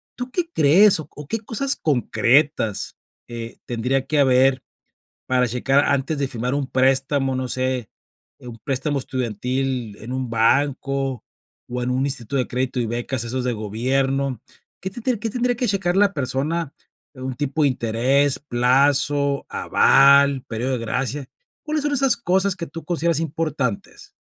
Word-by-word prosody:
¿Tú 250 0 -6
qué 345 -2 -2
crees, 185 - +5
o 155 - -8 0.2
qué 225 - -2
cosas 265 +6 -2
concretas, 135 - +1 0.3
eh, 115 -1 -7
tendría 125 +3 -1
que 155 - +1
haber 130 -1 +4 0.6
para 125 -1 +2
checar 135 +4 +2
antes 140 +2 0
de 140 -1 -1
firmar 125 +2 -2
un 145 -2 -1
préstamo, 135 +1 +1
no 130 0 -2
sé, 130 -2 -2 0.5
un 120 -2 -10
préstamo 140 +1 -1
estudiantil 125 -1 -3
en 115 +4 -8
un 130 -2 -3
banco, 135 +2 0 0.5
o 125 0 -2
en 125 - -1
un 130 +1 0
instituto 130 -2 -4
de 125 - 0
crédito 125 0 -2
y 115 - -1
becas, 120 +1 -3
esos 125 +2 -3
de 125 - -1
gobierno? 130 +4 -1 0.4
¿Qué 190 - -3
tendría 240 +2 -2
qué 225 +1 -2
tendría 245 +2 0
que 245 +1 -1
checar 190 -3 0
la 200 0 +4
persona 140 +3 -2 0.4
de 130 - -12
un 130 -1 -4
tipo 145 +3 -2
de 145 - +5
interés, 130 +3 +2
plazo, 140 +2 +2
aval, 140 0 +4
período 120 +4 -2
de - - 0
gracia? 130 +4 -3 0.3
¿Cuáles 305 -1 -2
son 295 - 0
esas 270 -3 +3
cosas 190 -2 +1
que 170 -1 -5
tú 165 0 -9
consideras 170 -2 0
importantes? 150 -8 -3
135 Hz, 155 wpm, -22 LUFS, 125-155 Hz, 0.6 s, crees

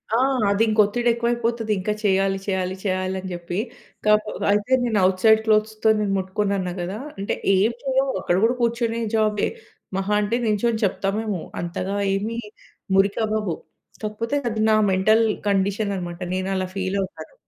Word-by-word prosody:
ఆ! - - +4 0.3
అదింక 215 +2 +2
ఒత్తిడెక్కువైపోతది. 235 0 0
ఇంకా 210 +3 -1
చేయాలి, 195 -1 +2
చేయాలి, 190 -2 -1
చేయాలి 185 -1 -1
అని 185 0 -6
చెప్పి. 175 0 -5 0.5
కాక 210 0 +5 0.3
అయితే 210 +5 +1
నేను 225 -4 +1
ఔట్ 185 0 -1
సైడ్ 220 -1 +6
క్లోత్స్‌తో 215 0 +2
నేను 205 -2 0
ముట్టుకోనన్నా 190 -1 -1
కదా! 185 +4 -4 0.2
అంటే 195 +1 -2 0.2
ఏం 200 +5 +3
చేయము. 270 0 +1
అక్కడ 175 - +1
కూడా 235 +3 +3
కూర్చొనే 235 -1 0
జాబే. 215 -2 +2 0.5
మహా 195 +2 -1
అంటే, 210 +3 0
నిల్చొని 220 +1 +1
చెప్తామేమో! 200 0 -1 0.2
అంతగా 180 +3 -3 0.2
ఏమి 220 +4 -3 0.6
మురికవ్వవు. 205 -1 +1 0.5
కాకపోతే, 220 +5 -2
అది 220 -1 -2
నా 215 - +5 0.2
మెంటల్ 215 +4 +4 0.2
కండిషనన్నమాట. 195 -3 -1 0.2
నేను 185 +1 -2
అలా 185 0 -1
ఫీలవుతాను. 195 - -3
205 Hz, 135 wpm, -23 LUFS, 190-225 Hz, 0.6 s, సైడ్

